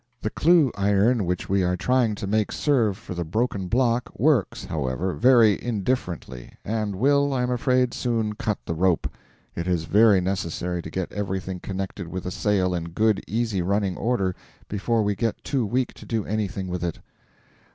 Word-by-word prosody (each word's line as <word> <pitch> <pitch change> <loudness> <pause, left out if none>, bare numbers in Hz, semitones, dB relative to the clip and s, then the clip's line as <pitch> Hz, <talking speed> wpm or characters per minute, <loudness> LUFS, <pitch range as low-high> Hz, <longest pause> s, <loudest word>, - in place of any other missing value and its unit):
The 110 - -1
clue 165 -5 +4
iron 100 +3 +2
which 90 0 -2
we 100 0 +2
are 90 0 +1
trying 120 +1 +2
to 100 - -5
make 105 +1 0
serve 115 -10 +1
for 110 -4 -8
the 85 0 -3
broken 100 +2 -1
block 120 +3 +1
works, 135 -6 +1
however, 75 +5 -2
very 120 -4 +4
indifferently, 95 - -3
and 105 -2 -2
will, 140 +5 +2
I 125 - +1
am 125 - -1
afraid, 125 0 +1
soon 115 -4 -1
cut 105 0 -2
the - - -2
rope. 90 +1 +1 0.5
It 85 +1 -4
is 90 -3 +1
very 105 +3 +5
necessary 90 -1 -2
to 80 - -8
get 95 +2 -3
everything 95 -2 -3
connected 95 -1 -5
with 90 +2 -5
the 90 - -4
sail 95 -2 +1
in 85 -2 -2
good 110 +4 +1
easy 110 -4 -1
running 100 +1 0
order 100 -5 0 0.3
before 110 +2 0
we 105 0 +1
get 115 +1 -2
too 130 -6 -1
weak 125 +4 -1
to - - -13
do 110 -3 -1
anything 100 -2 -2
with 90 -1 -4
it. 85 -2 -3
105 Hz, 180 wpm, -24 LUFS, 90-120 Hz, 0.5 s, very